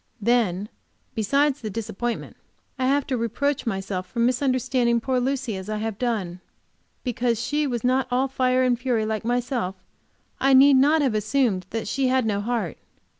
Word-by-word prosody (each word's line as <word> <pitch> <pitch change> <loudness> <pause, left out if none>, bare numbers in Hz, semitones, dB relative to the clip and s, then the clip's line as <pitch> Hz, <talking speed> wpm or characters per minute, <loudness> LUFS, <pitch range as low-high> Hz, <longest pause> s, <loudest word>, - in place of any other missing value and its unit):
Then, 210 -4 +1 0.5
besides 275 +6 +1
this 220 - -4
disappointment, 225 +2 -4 0.4
I 255 - +1
have 280 +1 +2
to 265 - -1
reproach 240 +4 -1
myself 190 -3 -3
for 235 - -13
misunderstanding 250 -1 +2
poor 255 +2 0
Lucy 260 -3 -1
as 190 +2 -7
I 215 - -2
have 215 -1 -4
done. 205 -8 -2 0.6
Because 245 -2 0
she 295 +5 0
was 240 -4 -3
not 255 +1 +2
all 255 +2 +1
fire 255 -1 +1
and 245 -2 +2
fury 245 -4 0
like 215 0 -2
myself, 240 -4 -1 0.6
I 270 0 +4
need 275 +1 +7
not 295 +3 +4
have 260 -5 +1
assumed 215 -3 0
that 225 -1 -4
she 265 +4 0
had 255 -1 +2
no 205 -2 0
heart. 220 -6 -2
245 Hz, 170 wpm, -24 LUFS, 215-260 Hz, 0.6 s, need